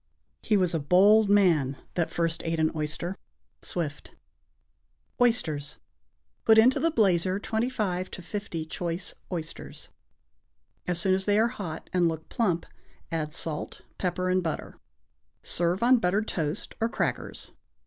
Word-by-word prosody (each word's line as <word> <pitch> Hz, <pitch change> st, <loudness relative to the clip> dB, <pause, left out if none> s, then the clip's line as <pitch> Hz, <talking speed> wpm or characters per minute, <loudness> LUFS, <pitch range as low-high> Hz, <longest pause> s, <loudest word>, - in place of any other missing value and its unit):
He 210 Hz, -, +2 dB
was 180 Hz, -3 st, +2 dB
a 165 Hz, -, +1 dB
bold 195 Hz, +8 st, +5 dB
man 165 Hz, -10 st, +4 dB, 0.2 s
that 170 Hz, -2 st, 0 dB
first 165 Hz, 0 st, -1 dB
ate 165 Hz, -1 st, -1 dB
an 155 Hz, 0 st, +2 dB
oyster. 160 Hz, +4 st, -2 dB, 0.5 s
Swift. 155 Hz, -5 st, -4 dB, 1.1 s
=Oysters.= 155 Hz, -, +1 dB, 0.7 s
Put 220 Hz, -1 st, +6 dB
into 240 Hz, +4 st, +6 dB
the 330 Hz, -, +2 dB
blazer 190 Hz, -, +2 dB
twenty 220 Hz, +4 st, -1 dB
five 185 Hz, -7 st, -2 dB
to 180 Hz, -, -9 dB
fifty 175 Hz, -4 st, -4 dB
choice 170 Hz, +2 st, -3 dB, 0.2 s
oysters. 165 Hz, -3 st, -6 dB, 1.0 s
As 175 Hz, -1 st, 0 dB
soon 190 Hz, +1 st, +3 dB
as 190 Hz, 0 st, +1 dB
they 205 Hz, 0 st, +3 dB
are 225 Hz, +2 st, +4 dB
hot 170 Hz, -8 st, -6 dB
and 175 Hz, -2 st, +3 dB
look 160 Hz, -1 st, -6 dB
plump, 180 Hz, -8 st, 0 dB, 0.5 s
add 155 Hz, -2 st, -2 dB
salt, 155 Hz, -1 st, -4 dB, 0.2 s
pepper 185 Hz, 0 st, -1 dB
and 185 Hz, 0 st, +3 dB
butter. 165 Hz, -3 st, -4 dB, 0.7 s
Serve 175 Hz, +4 st, 0 dB
on 250 Hz, +1 st, +6 dB
buttered 210 Hz, +1 st, +1 dB
toast 160 Hz, +2 st, -2 dB
or 225 Hz, -, +2 dB
crackers. -, -, -3 dB
180 Hz, 140 wpm, -27 LUFS, 165-205 Hz, 1.1 s, Put